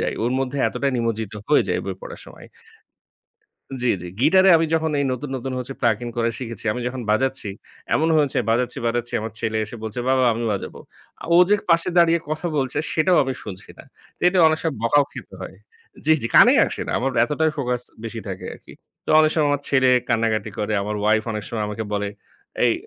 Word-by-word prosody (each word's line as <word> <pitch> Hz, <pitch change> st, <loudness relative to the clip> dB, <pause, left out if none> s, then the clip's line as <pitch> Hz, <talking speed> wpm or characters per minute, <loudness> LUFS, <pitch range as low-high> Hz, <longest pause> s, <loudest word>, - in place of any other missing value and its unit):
যাই। -, -, -1 dB
ওর 120 Hz, +2 st, 0 dB
মধ্যে 135 Hz, +1 st, -3 dB
এতটাই 140 Hz, -1 st, -2 dB
নিমজ্জিত 115 Hz, -3 st, -2 dB, 0.2 s
হয়ে 150 Hz, -, +5 dB
যাই -, -, 0 dB
বই -, -, -3 dB
পড়ার -, -, -9 dB
সময়। -, -, -13 dB, 1.3 s
জ্বি, 125 Hz, -1 st, +2 dB
জ্বি। 90 Hz, -, -7 dB
গিটারে 185 Hz, +6 st, +5 dB
আমি 165 Hz, -, +1 dB
যখন 160 Hz, 0 st, +1 dB
এই -, -, +1 dB
নতুন, 130 Hz, +3 st, -5 dB
নতুন 130 Hz, +1 st, -5 dB
হচ্ছে 125 Hz, +2 st, -6 dB
প্লাগিং 120 Hz, -1 st, +1 dB
করে 115 Hz, 0 st, +1 dB
শিখেছি। 115 Hz, -3 st, -7 dB
আমি 125 Hz, -, -5 dB
যখন 130 Hz, +1 st, -6 dB
বাজাচ্ছি, 130 Hz, -1 st, 0 dB, 0.4 s
এমনও 160 Hz, +2 st, +2 dB
হয়েছে 145 Hz, -3 st, +1 dB
বাজাচ্ছি, 120 Hz, +2 st, 0 dB
বাজাচ্ছি। 120 Hz, 0 st, -2 dB
আমার 110 Hz, +1 st, -5 dB
ছেলে 110 Hz, -1 st, -1 dB
এসে 105 Hz, +3 st, -9 dB
বলছে 110 Hz, +3 st, -4 dB
"বাবা 130 Hz, -1 st, +3 dB
আমি 115 Hz, -, -3 dB
বাজাবো।" 100 Hz, -, -5 dB, 0.4 s
আ -, -, -8 dB
ও -, -, +7 dB
যে 205 Hz, -, +5 dB, 0.2 s
পাশে 170 Hz, +1 st, +3 dB
দাঁড়িয়ে 170 Hz, 0 st, +5 dB
কথা 155 Hz, +3 st, -2 dB
বলছে 130 Hz, -2 st, -1 dB
সেটাও 175 Hz, +3 st, +3 dB
আমি 130 Hz, -1 st, -3 dB
শুনছি 95 Hz, -3 st, -9 dB
না। -, -, -12 dB, 0.4 s
এটা 180 Hz, +1 st, +3 dB
অনেক 155 Hz, 0 st, 0 dB
সময় 160 Hz, -3 st, -1 dB
বকাও 145 Hz, +5 st, +4 dB
খেতে -, -, -10 dB
হয়। -, -, -9 dB, 0.5 s
জ্বি, 155 Hz, -, +4 dB
জি 115 Hz, -, -2 dB
কানেই -, -, +7 dB
আসে -, -, -6 dB
না। -, -, -1 dB
আমার 135 Hz, +3 st, 0 dB
এতটাই 155 Hz, +5 st, 0 dB
ফোকাস 125 Hz, -3 st, -1 dB, 0.2 s
বেশি 115 Hz, 0 st, -5 dB
থাকে 95 Hz, -1 st, -6 dB
আরকি। -, -, -15 dB, 0.3 s
তো -, -, -2 dB
অনেক 155 Hz, -, +4 dB
সময় 155 Hz, -3 st, +2 dB
আমার 145 Hz, 0 st, -1 dB
ছেলে 130 Hz, -2 st, +3 dB, 0.2 s
কান্নাকাটি 110 Hz, -2 st, 0 dB
করে। 105 Hz, +1 st, -2 dB
আমার 105 Hz, +1 st, -3 dB
ওয়াইফ 110 Hz, +1 st, +3 dB
অনেক 105 Hz, -1 st, -4 dB
সময় 110 Hz, -2 st, -3 dB
আমাকে 105 Hz, +1 st, -4 dB
বলে, 100 Hz, 0 st, -1 dB, 0.6 s
এই -, -, +3 dB
125 Hz, 205 wpm, -22 LUFS, 110-150 Hz, 1.3 s, ও